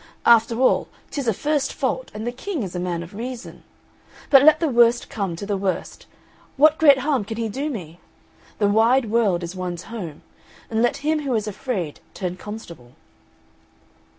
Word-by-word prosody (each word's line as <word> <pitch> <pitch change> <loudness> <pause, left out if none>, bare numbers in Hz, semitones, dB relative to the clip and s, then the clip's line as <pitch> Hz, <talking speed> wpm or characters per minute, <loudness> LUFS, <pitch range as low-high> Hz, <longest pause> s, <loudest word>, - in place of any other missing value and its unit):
After 230 0 +5
all 260 - +3 0.2
tis 280 -4 -3
a - - +4
first 295 +6 -1
fault, - - -2
and 215 +1 -5
the 240 - -1
King 290 - -4
is 185 -2 -6
a - - -2
man 175 -1 -2
of 170 - -12
reason; 240 +3 -7 0.7
but 275 -2 +9
let 310 +2 +6
the 330 - +1
worst 240 -2 +3
come 195 -6 -2
to 185 - -6
the 200 -1 -1
worst, 190 -1 -3 0.5
what 305 +2 +5
great 285 -4 +7
harm 270 -3 0
can 220 +2 -6
he 230 -1 -1
do 275 +8 -3
me? 175 - -7 0.6
The 205 - +2
wide 225 +3 +3
world 205 -7 +2
is 170 +2 -6
one's 180 -2 -4
home; 175 -10 -7 0.5
and 220 0 +1
let 240 - +2
him 310 0 +2
who 270 -4 -1
is 215 -1 -1
afraid 200 - -4 0.2
turn 180 -3 -3
constable." 170 - -10
225 Hz, 180 wpm, -22 LUFS, 185-265 Hz, 0.7 s, but